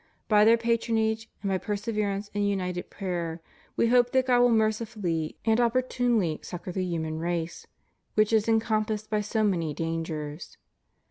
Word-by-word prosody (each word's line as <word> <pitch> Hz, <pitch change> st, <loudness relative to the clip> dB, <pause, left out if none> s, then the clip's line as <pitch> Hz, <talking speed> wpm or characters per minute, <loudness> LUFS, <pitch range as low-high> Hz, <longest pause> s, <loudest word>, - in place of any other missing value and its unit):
By 210 Hz, -1 st, +5 dB
their 230 Hz, +1 st, +6 dB
patronage, 225 Hz, -1 st, 0 dB
and 200 Hz, -, -1 dB
by 190 Hz, -1 st, +1 dB
perseverance 205 Hz, -1 st, -2 dB
in 205 Hz, -, -1 dB
united 185 Hz, -3 st, -1 dB
prayer. 175 Hz, -4 st, -3 dB, 0.4 s
We 230 Hz, -, +2 dB
hope 245 Hz, 0 st, +4 dB
that 260 Hz, -1 st, +3 dB
God 245 Hz, -1 st, +4 dB
will 245 Hz, -, +5 dB
mercifully 215 Hz, -7 st, 0 dB
and 225 Hz, +1 st, +3 dB
opportunely 240 Hz, -7 st, +1 dB
succor 180 Hz, 0 st, -7 dB
the 185 Hz, +1 st, -2 dB
human 160 Hz, -3 st, -3 dB
race, 170 Hz, 0 st, -3 dB, 0.5 s
which 215 Hz, +1 st, +3 dB
is 220 Hz, -1 st, +3 dB
enconi' 220 Hz, -1 st, +2 dB
passed 215 Hz, -1 st, -4 dB
by 210 Hz, -1 st, +2 dB
so 215 Hz, +1 st, -1 dB
many 170 Hz, -7 st, 0 dB
dangers. 165 Hz, -2 st, -4 dB
210 Hz, 155 wpm, -27 LUFS, 175-225 Hz, 0.5 s, their